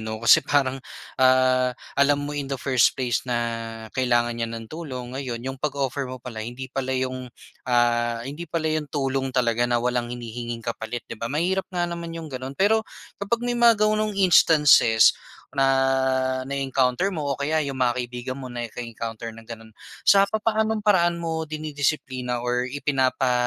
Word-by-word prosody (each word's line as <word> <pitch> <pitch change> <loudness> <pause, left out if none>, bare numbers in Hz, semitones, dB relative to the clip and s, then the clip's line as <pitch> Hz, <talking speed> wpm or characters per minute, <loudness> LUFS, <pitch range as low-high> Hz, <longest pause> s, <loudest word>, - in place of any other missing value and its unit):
'no? 110 0 -4
Kasi 115 +8 +6
parang, 135 -2 0 0.4
ah, 130 -1 +4 0.2
alam 145 0 +2
mo 145 - -4
in 145 -2 -4
the 135 - -2
first 130 -1 +2
place 125 -3 0
na 120 - 0 0.6
kailangan 120 -2 +1
niya 115 -1 -3
ng 115 0 -6
tulong, 130 -3 -7
ngayon 125 -3 -5
'yong 135 0 -5
pag-offer 140 -2 -2
mo 130 - -6
pala, 120 -3 -8
hindi 125 +4 -7
pala 130 -1 -2
'yong 130 -1 -3 0.4
ah, 120 -1 +2
hindi 150 +5 -7
pala 165 0 -2
'yon 155 -2 -2
tulong 135 -2 -1
talaga 120 -2 +1
na 120 - +2
walang 120 0 -1
hinihinging 120 -1 -6
kapalit, 115 0 -4
'di - - -9
ba? 115 - -2
Mahirap 180 +7 -1
nga 175 -1 -1
naman 170 -1 -5
'yong 160 -3 -8
gano'n. 130 +1 -6
Pero 220 +3 +3 0.4
kapag 230 +4 -1
may 245 - 0
mga 235 -1 +5
gano'ng 215 -1 0
instances 150 - +6 0.4
na 135 -1 +1 0.8
na-encounter 135 +3 0
mo 155 -7 -2
o - - -1
kaya 145 +4 0
'yong 140 -1 -4
mga 125 -2 +1
kaibigan 125 +1 -4
mo 130 -2 -8
naka-encounter 115 -1 -6
ng 115 0 -14
gano'n, 115 -1 -10 0.3
sa 200 0 +6
papaanong 220 0 0
paraan 175 -4 +3
mo 160 -2 -3
dinidisiplina 140 -5 -2
or 125 +1 0
ipinapa, 130 -2 0
130 Hz, 165 wpm, -24 LUFS, 120-155 Hz, 0.8 s, Kasi